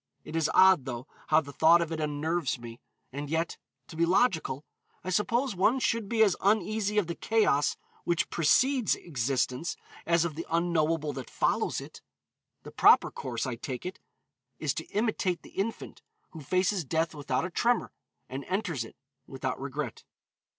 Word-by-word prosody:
It 155 Hz, -, -8 dB
is 160 Hz, -2 st, +1 dB
odd, 185 Hz, -7 st, +6 dB
though, 120 Hz, -1 st, -5 dB, 0.2 s
how 155 Hz, +1 st, +5 dB
the 140 Hz, -2 st, -10 dB
thought 165 Hz, +4 st, +6 dB
of 170 Hz, -1 st, -2 dB
it 160 Hz, -, -3 dB
unnerves 155 Hz, 0 st, -1 dB
one, 120 Hz, -1 st, -10 dB, 0.3 s
and 145 Hz, +1 st, -5 dB
yet, 160 Hz, +2 st, -1 dB, 0.3 s
to -, -, -11 dB
be 165 Hz, -, +1 dB
logical, 170 Hz, -, +1 dB, 0.4 s
I 185 Hz, -, -3 dB
suppose 230 Hz, +5 st, +1 dB
one 205 Hz, +8 st, +3 dB
should 230 Hz, -4 st, 0 dB
be 225 Hz, -1 st, +4 dB
as 200 Hz, -4 st, +3 dB
uneasy 210 Hz, +1 st, +1 dB
of 210 Hz, -, +3 dB
the 170 Hz, -, -3 dB
chaos 210 Hz, -9 st, +2 dB, 0.3 s
which 170 Hz, -1 st, 0 dB
precedes 250 Hz, -, +3 dB
existence 130 Hz, 0 st, -2 dB, 0.3 s
as 170 Hz, 0 st, +3 dB
of 165 Hz, -, -3 dB
the 165 Hz, +3 st, -6 dB
unknowable 165 Hz, -3 st, +1 dB
that 130 Hz, -3 st, -7 dB
follows -, -, 0 dB
it. -, -, -11 dB, 0.6 s
The -, -, -10 dB
proper -, -, +5 dB
course, 120 Hz, -3 st, -4 dB
I 130 Hz, -, -2 dB
take 125 Hz, +4 st, -6 dB
it, 185 Hz, -, -5 dB, 0.6 s
is -, -, -1 dB
to -, -, -6 dB
imitate 205 Hz, -4 st, -1 dB
the -, -, -13 dB
infant, 215 Hz, +4 st, -4 dB, 0.3 s
who 160 Hz, -, -9 dB
faces 185 Hz, +5 st, +1 dB
death 160 Hz, +3 st, -1 dB
without 150 Hz, +2 st, -1 dB
a 185 Hz, -, -5 dB
tremor, 240 Hz, +6 st, +1 dB, 0.4 s
and 135 Hz, +2 st, -6 dB
enters 180 Hz, -, -2 dB
it 115 Hz, -, -12 dB, 0.3 s
without -, -, -4 dB
regret." -, -, -5 dB
165 Hz, 170 wpm, -29 LUFS, 145-195 Hz, 0.6 s, odd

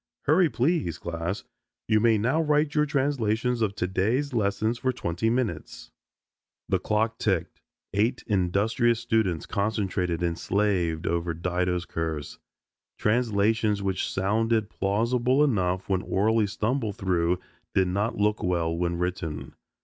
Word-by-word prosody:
"Hurry, 160 Hz, +3 st, +4 dB
please, 130 Hz, -, 0 dB
class. 85 Hz, +3 st, -4 dB, 0.4 s
You 110 Hz, -1 st, +4 dB
may 115 Hz, 0 st, +4 dB
now 125 Hz, +10 st, +1 dB
write 150 Hz, -1 st, +2 dB
your 150 Hz, -1 st, +2 dB
translations 125 Hz, -4 st, 0 dB
of 100 Hz, -3 st, 0 dB
today's 110 Hz, +10 st, 0 dB
lesson 110 Hz, 0 st, +1 dB
for 130 Hz, +2 st, -1 dB
twenty 100 Hz, -3 st, -1 dB
minutes." 115 Hz, -9 st, -3 dB, 0.8 s
The -, -, +1 dB
clock 110 Hz, +1 st, 0 dB
ticked, 95 Hz, -6 st, -1 dB, 0.3 s
eight 110 Hz, +6 st, +1 dB
industrious 105 Hz, +5 st, +1 dB
students 110 Hz, -8 st, 0 dB
concentrated 95 Hz, -4 st, -1 dB
and 85 Hz, -1 st, -1 dB
slaved 90 Hz, -6 st, 0 dB
over 85 Hz, -1 st, -1 dB
Dido's 90 Hz, +1 st, -1 dB
curse. 80 Hz, -3 st, -4 dB, 0.6 s
Translations 105 Hz, -2 st, +1 dB
which 95 Hz, -1 st, -1 dB
sounded 110 Hz, +3 st, +1 dB
plausible 120 Hz, +7 st, +1 dB
enough 95 Hz, -9 st, 0 dB
when 95 Hz, -2 st, +1 dB
orally 105 Hz, +3 st, +2 dB
stumbled 110 Hz, +1 st, -1 dB
through 90 Hz, -2 st, +1 dB, 0.4 s
did 95 Hz, -1 st, +3 dB
not 105 Hz, +6 st, -1 dB
look 105 Hz, +1 st, +1 dB
well 85 Hz, -2 st, 0 dB
when 85 Hz, 0 st, -1 dB
written. 85 Hz, -4 st, -3 dB
105 Hz, 125 wpm, -26 LUFS, 90-115 Hz, 0.8 s, Hurry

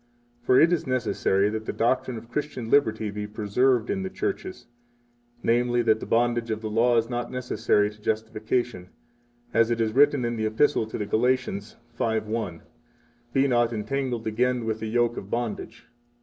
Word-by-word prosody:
For 125 Hz, +1 st, +4 dB
it 165 Hz, +3 st, +5 dB
is 165 Hz, -3 st, -1 dB
necessary 105 Hz, -6 st, +1 dB
that 110 Hz, 0 st, -4 dB
the -, -, 0 dB
doctrine 125 Hz, +1 st, 0 dB
of 115 Hz, +1 st, -11 dB
Christian 130 Hz, -6 st, -4 dB
liberty 110 Hz, -6 st, +2 dB
be 105 Hz, 0 st, -5 dB
preserved 110 Hz, +3 st, +1 dB
in 195 Hz, -, -1 dB
the 190 Hz, -, -3 dB
churches, 380 Hz, -, -4 dB, 0.8 s
namely, 120 Hz, +1 st, +2 dB
that 110 Hz, -1 st, +3 dB
the -, -, -7 dB
bondage 120 Hz, 0 st, +1 dB
of 110 Hz, 0 st, -2 dB
the 110 Hz, -1 st, -4 dB
Law 120 Hz, +2 st, +3 dB
is 115 Hz, 0 st, +2 dB
not 120 Hz, 0 st, -3 dB
necessary 120 Hz, -4 st, +1 dB
to 105 Hz, 0 st, -18 dB
justification, 110 Hz, -2 st, -2 dB, 0.6 s
as 115 Hz, 0 st, +4 dB
it 120 Hz, -1 st, 0 dB
is 110 Hz, -1 st, 0 dB
written 140 Hz, -2 st, +4 dB
in 120 Hz, 0 st, -2 dB
the 110 Hz, 0 st, 0 dB
Epistle 110 Hz, +1 st, +2 dB
to -, -, -5 dB
the 105 Hz, -, -2 dB
Galatians 115 Hz, -1 st, 0 dB, 0.2 s
5:1: 110 Hz, -5 st, -2 dB, 0.7 s
Be 135 Hz, +2 st, +3 dB
not 120 Hz, -2 st, +2 dB
entangled 120 Hz, +1 st, -2 dB
again 120 Hz, +2 st, 0 dB
with 110 Hz, -1 st, -2 dB
the 110 Hz, 0 st, -4 dB
yoke 120 Hz, +1 st, +1 dB
of 100 Hz, -, -7 dB
bondage. 115 Hz, 0 st, -4 dB
115 Hz, 175 wpm, -26 LUFS, 110-125 Hz, 0.8 s, it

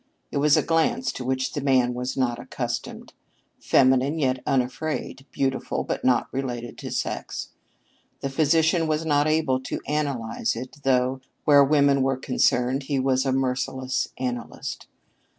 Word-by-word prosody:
It -, -, -2 dB
was 145 Hz, +1 st, +4 dB
a -, -, +2 dB
glance 240 Hz, +10 st, +1 dB
to 130 Hz, -, -6 dB
which 130 Hz, +1 st, -1 dB
the 145 Hz, -, -2 dB
man 130 Hz, -3 st, +3 dB
was 125 Hz, +2 st, -4 dB
not 120 Hz, -2 st, 0 dB
accustomed 120 Hz, -1 st, -5 dB, 0.5 s
feminine 130 Hz, +3 st, +3 dB
yet 130 Hz, -4 st, 0 dB
unafraid, 135 Hz, +2 st, -2 dB
beautiful 135 Hz, -1 st, -1 dB
but -, -, -3 dB
not 125 Hz, -2 st, +3 dB
related 120 Hz, -3 st, -4 dB
to -, -, -6 dB
sex. -, -, -4 dB, 0.7 s
The 135 Hz, -, -2 dB
physician 160 Hz, +3 st, +3 dB
was 155 Hz, +1 st, 0 dB
not 145 Hz, -1 st, +2 dB
able 155 Hz, -4 st, +2 dB
to 130 Hz, -, -4 dB
analyze 135 Hz, -7 st, -1 dB
it, 125 Hz, +5 st, -7 dB
though 130 Hz, 0 st, +1 dB, 0.2 s
where 145 Hz, -1 st, +7 dB
women 140 Hz, -1 st, +3 dB
were 135 Hz, 0 st, +1 dB
concerned 130 Hz, 0 st, +1 dB
he 140 Hz, -2 st, +1 dB
was 130 Hz, 0 st, +1 dB
a -, -, +2 dB
merciless 130 Hz, 0 st, -1 dB
analyst. 125 Hz, -2 st, -5 dB
135 Hz, 150 wpm, -25 LUFS, 125-145 Hz, 0.7 s, where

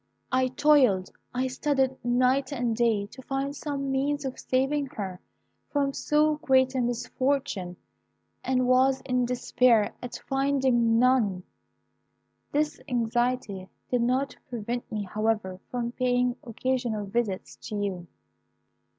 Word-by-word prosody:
I 255 Hz, 0 st, +3 dB
toiled, 255 Hz, -8 st, +3 dB, 0.2 s
I 255 Hz, +1 st, -1 dB
studied 265 Hz, 0 st, 0 dB
night 255 Hz, +4 st, +2 dB
and 245 Hz, -4 st, -1 dB
day 225 Hz, -3 st, +2 dB
to 255 Hz, +6 st, -12 dB
find 275 Hz, +2 st, -3 dB
some 280 Hz, -2 st, -3 dB
means 285 Hz, +2 st, 0 dB
of 260 Hz, -, -4 dB
saving 275 Hz, +2 st, 0 dB
her 190 Hz, -3 st, -4 dB, 0.5 s
from 280 Hz, -1 st, 0 dB
so 300 Hz, +1 st, +2 dB
great 260 Hz, -3 st, +3 dB
a 260 Hz, -, 0 dB
misfortune, 240 Hz, -6 st, -1 dB, 0.7 s
and 255 Hz, 0 st, +1 dB
was 260 Hz, +1 st, +4 dB
in 250 Hz, -1 st, 0 dB
despair 245 Hz, -3 st, +3 dB
at 245 Hz, -, -6 dB
finding 265 Hz, -4 st, +2 dB
none. 230 Hz, -7 st, +3 dB, 1.1 s
"This 300 Hz, +1 st, 0 dB
anxiety 240 Hz, -5 st, -1 dB, 0.2 s
did 250 Hz, -1 st, +2 dB
not 255 Hz, +3 st, 0 dB
prevent 240 Hz, 0 st, -4 dB
me, 210 Hz, -1 st, -2 dB
however, 210 Hz, -1 st, -1 dB
from 240 Hz, -1 st, -2 dB
paying 250 Hz, 0 st, +1 dB
occasional 240 Hz, -3 st, -2 dB
visits 200 Hz, -2 st, -2 dB
to 215 Hz, -, -4 dB
you. 195 Hz, -4 st, -3 dB
250 Hz, 125 wpm, -27 LUFS, 225-270 Hz, 1.1 s, was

